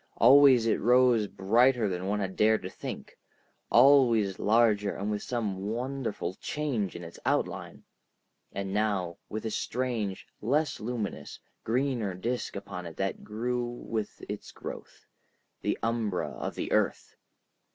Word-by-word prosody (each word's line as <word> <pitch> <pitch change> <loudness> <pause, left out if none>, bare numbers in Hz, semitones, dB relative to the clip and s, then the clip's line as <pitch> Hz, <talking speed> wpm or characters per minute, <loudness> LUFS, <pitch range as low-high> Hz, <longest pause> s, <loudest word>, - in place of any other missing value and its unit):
Always 135 -4 +7
it 115 - +2
rose 120 -2 +4
brighter 115 +5 +3
than 90 0 -3
one 105 +1 0
had 95 -1 -3
dared 110 -1 +3
to 95 - -5
think, - - -8 0.5
always 120 -6 +5
larger 105 -2 +3
and 100 +2 -3
with 105 -1 -2
some 105 -5 -3
wonderful 125 -4 -3
change 130 -10 -2
in 85 - -7
its 85 0 -10
outline, - - -2 0.7
and 100 0 -4
now 100 -5 -1
with 110 +1 -5
a 110 - -2
strange, 115 -6 -2 0.2
less 145 +8 0
luminous, 105 -9 -4 0.2
greener 120 -5 0
disk 120 +7 -3
upon 95 -3 -6
it 80 - -10
that 95 0 -2
grew 120 +3 -2
with 115 -3 -5
its - - -6
growth, - - -9 0.6
the - - 0
umbra 115 -5 -1
of - - -5
the - - -4
earth. - - 0
110 Hz, 140 wpm, -29 LUFS, 100-125 Hz, 0.7 s, Always